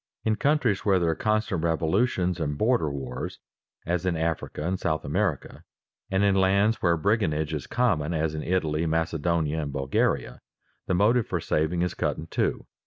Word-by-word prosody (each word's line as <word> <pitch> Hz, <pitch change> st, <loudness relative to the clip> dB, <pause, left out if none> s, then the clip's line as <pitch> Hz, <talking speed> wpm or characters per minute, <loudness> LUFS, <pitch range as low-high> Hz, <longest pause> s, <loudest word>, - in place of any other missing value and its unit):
In 110 Hz, -1 st, +2 dB
countries 135 Hz, -7 st, +1 dB
where 100 Hz, -2 st, +3 dB
there 85 Hz, -2 st, +2 dB
are -, -, -2 dB
constant 105 Hz, -3 st, 0 dB
revolutions 90 Hz, +3 st, +1 dB
and 75 Hz, -2 st, -2 dB
border 110 Hz, -, +2 dB
wars, 70 Hz, -2 st, -5 dB, 0.5 s
as 90 Hz, +1 st, -1 dB
in 90 Hz, -3 st, 0 dB
Africa 80 Hz, -1 st, -2 dB
and 95 Hz, +1 st, -1 dB
South 80 Hz, -1 st, -1 dB
America, 90 Hz, 0 st, -2 dB, 0.5 s
and 95 Hz, +1 st, +1 dB
in 100 Hz, -1 st, +4 dB
lands 100 Hz, +3 st, +3 dB
where 85 Hz, -2 st, +3 dB
brigandage 80 Hz, -5 st, 0 dB
is 75 Hz, -4 st, -4 dB
common, 95 Hz, -11 st, +1 dB
as 80 Hz, -1 st, 0 dB
in 75 Hz, -, -3 dB
Italy, 80 Hz, -3 st, 0 dB
Macedonia, 80 Hz, -1 st, 0 dB
and 70 Hz, -2 st, -4 dB
Bulgaria, 70 Hz, -1 st, -1 dB, 0.5 s
the 95 Hz, -, +1 dB
motive 110 Hz, +5 st, +3 dB
for 90 Hz, -, -1 dB
saving 85 Hz, +1 st, 0 dB
is 90 Hz, -, -1 dB
cut -, -, -1 dB
in 75 Hz, -, -6 dB
two. -, -, -1 dB
85 Hz, 175 wpm, -26 LUFS, 80-100 Hz, 0.5 s, in